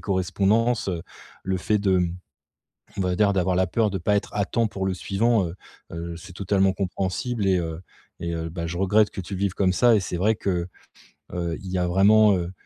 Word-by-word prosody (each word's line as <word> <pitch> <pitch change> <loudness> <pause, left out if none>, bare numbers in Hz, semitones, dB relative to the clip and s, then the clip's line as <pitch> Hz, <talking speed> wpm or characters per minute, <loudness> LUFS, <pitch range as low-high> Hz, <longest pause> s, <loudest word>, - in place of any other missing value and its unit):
correspondances, 100 +5 +1
heu, 85 -3 -3 0.4
le 95 0 0
fait 105 +4 +1
de 95 -2 +2
mmh, 90 -1 -1 0.8
on - - 0
va 90 -1 0
dire 105 0 +3
d'avoir 95 -1 +1
la 95 - +3
peur 110 +2 +1
de 95 - -2
pas 105 +4 +1
être 100 - -3
à 100 - +1
temps 115 +3 0
pour 95 -2 -3
le 95 - 0
suivant. 105 +2 +1
Heu 85 - -6 0.4
heu, 85 0 -5
c'est 95 +3 -11
totalement 95 0 +2
compréhensible 100 +4 -2
et 95 -1 +3
heu 80 -1 -4 0.4
et 85 0 -3
heu, 80 0 -3
bah 85 0 -4
je 85 +1 -5
regrette 105 +2 +3
que - - -6
tu 95 +2 -7
le - - -4
vives 100 -2 0
comme 95 -2 +2
ça. 120 +5 +4
Et - - +2
c'est 90 - -4
vrai 105 +5 +2
que, 90 -4 -2 0.7
heu, 85 -2 -2
il 95 - -6
y 95 - -1
a 90 -1 +1
vraiment, 105 +3 +5
heu, 90 -1 -3
95 Hz, 230 wpm, -24 LUFS, 90-105 Hz, 0.8 s, vraiment